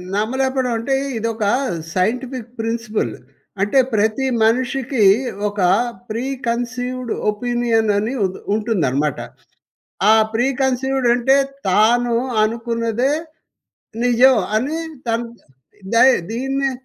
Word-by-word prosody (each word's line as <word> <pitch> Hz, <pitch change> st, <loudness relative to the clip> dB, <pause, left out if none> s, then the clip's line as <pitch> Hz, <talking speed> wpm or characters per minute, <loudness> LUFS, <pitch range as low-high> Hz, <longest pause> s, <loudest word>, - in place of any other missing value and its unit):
నమ్మలేకపోడం 260 Hz, +3 st, 0 dB
అంటే 270 Hz, +4 st, 0 dB, 0.2 s
ఇదొక 225 Hz, 0 st, -2 dB, 0.5 s
scientific 240 Hz, +5 st, -2 dB
principal. 225 Hz, -, -2 dB, 0.5 s
అంటే 205 Hz, +7 st, +3 dB, 0.2 s
ప్రతి 220 Hz, +5 st, +1 dB, 0.2 s
మనిషికి 250 Hz, +1 st, +1 dB, 0.5 s
ఒక 205 Hz, 0 st, -8 dB, 0.5 s
ప్రీ 230 Hz, +4 st, -3 dB, 0.2 s
కన్సీవ్‌డ్ 245 Hz, +1 st, -3 dB, 0.2 s
ఒపీనియన్ 235 Hz, 0 st, 0 dB
అని 215 Hz, +5 st, -1 dB
ఉన్ 190 Hz, 0 st, -4 dB, 0.2 s
ఉంటుందనమాట. 155 Hz, -, 0 dB, 0.9 s
ఆ -, -, +7 dB, 0.2 s
ప్రీ 240 Hz, +3 st, +2 dB, 0.2 s
కన్సీవ్‌డ్ 265 Hz, 0 st, 0 dB
అంటే 250 Hz, +3 st, +3 dB, 0.3 s
తాను 235 Hz, +5 st, +3 dB, 0.3 s
అనుకున్నదే 230 Hz, +3 st, -1 dB, 0.9 s
నిజం 245 Hz, +2 st, +5 dB, 0.2 s
అని 275 Hz, +8 st, -1 dB, 0.3 s
తను 230 Hz, +1 st, -1 dB, 0.7 s
దయి 255 Hz, +3 st, +6 dB, 0.2 s
దీన్నే 270 Hz, +3 st, -1 dB
235 Hz, 95 wpm, -19 LUFS, 220-255 Hz, 0.9 s, ఆ